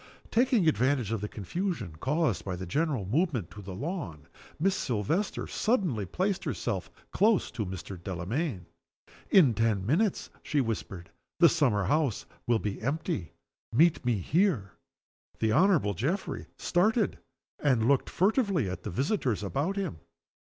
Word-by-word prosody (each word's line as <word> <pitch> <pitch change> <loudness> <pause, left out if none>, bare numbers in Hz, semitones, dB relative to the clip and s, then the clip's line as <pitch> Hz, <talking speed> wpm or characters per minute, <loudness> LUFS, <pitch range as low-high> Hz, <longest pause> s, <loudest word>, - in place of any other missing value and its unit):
Taking 235 -6 +3
advantage 130 -6 +2
of 115 -3 -1
the 105 - -2
confusion 150 - -4
caused 145 - 0
by 95 -2 -3
the 95 +1 -6
general 140 - 0
movement 120 - 0
to 105 - -9
the 95 -1 -7
lawn, 95 - -5 0.3
Miss 190 +4 +2
Silvester 130 - -1
suddenly 175 - 0
placed 190 - -1
herself - - -3 0.2
close 215 -1 +3
to 110 -3 -3
Mr. 95 0 -7
Delamayn. 95 - -3 0.6
"In 150 -11 +6
ten 110 -4 +1
minutes," 180 - +1
she 150 - 0
whispered, 105 -8 -3 0.3
"the 170 -1 +8
summer 125 -11 +2
house 140 - +1 0.2
will 120 -1 +4
be 105 -2 -4
empty. 135 - -2 0.4
Meet 155 +7 +4
me 120 -2 +2
here." 135 - +1 0.7
The 110 -1 +1
Honorable 155 - +4
Geoffrey 150 - -2
started, 210 +5 +1 0.4
and 125 -6 +2
looked 140 -1 +3
furtively 195 - +2
at 90 0 -5
the 105 - -5
visitors 130 - 0
about 140 - -1
him. 190 - -3
130 Hz, 140 wpm, -29 LUFS, -, 0.7 s, the